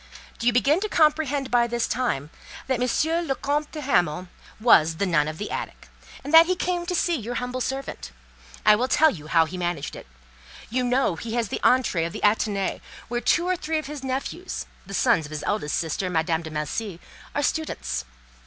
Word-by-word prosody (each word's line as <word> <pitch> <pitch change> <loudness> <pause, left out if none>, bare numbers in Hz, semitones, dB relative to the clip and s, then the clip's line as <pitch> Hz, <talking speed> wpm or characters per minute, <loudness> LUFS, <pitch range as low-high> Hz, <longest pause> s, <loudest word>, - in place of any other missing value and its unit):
"Do 235 - -1
you - - +6
begin 275 +7 +3
to 425 +2 -3
comprehend 300 -5 +2
by 240 -1 +4
this 235 0 -1
time 160 - -1 0.3
that 260 -2 -1
M. 320 +7 +1
le 270 - 0
Comte 290 +3 -1
de 305 - -6
Hamal 180 - +1 0.3
was 165 -8 +5
the 200 - 0
nun 160 -5 +2
of 155 0 -5
the 210 - -5
attic, - - -6 0.3
and 290 - -6
that 325 +1 +9
he 370 - +1
came 350 -1 -2
to 360 - -1
see 345 0 +1
your 240 -3 -4
humble 250 +1 -3
servant? 270 - -4 0.6
I 210 - +8
will 245 +4 0
tell 310 +3 +5
you 155 - -9
how 165 +1 +4
he 180 +3 -7
managed 175 -5 -3
it. - - -10 0.6
You 255 +1 +1
know 245 -8 +1
he 225 +5 -5
has 235 -4 0
the - - -3
entrée 220 -10 +3
of 170 - -9
the - - -6
Athénée, 205 -2 +1 0.3
where 240 0 -1
two 345 +6 +2
or 370 - +2
three 320 -2 -2
of 310 - -3
his 290 -1 -7
nephews, 270 +7 -4 0.2
the 195 - -5
sons 160 -3 +3
of - - -15
his 155 -1 -5
eldest 180 -8 -1
sister, 170 +3 -2
Madame 160 -1 0
de 160 - -7
Melcy, 165 +5 -4 0.4
are 290 - +1
students. 315 - -2
240 Hz, 210 wpm, -25 LUFS, 175-290 Hz, 0.6 s, that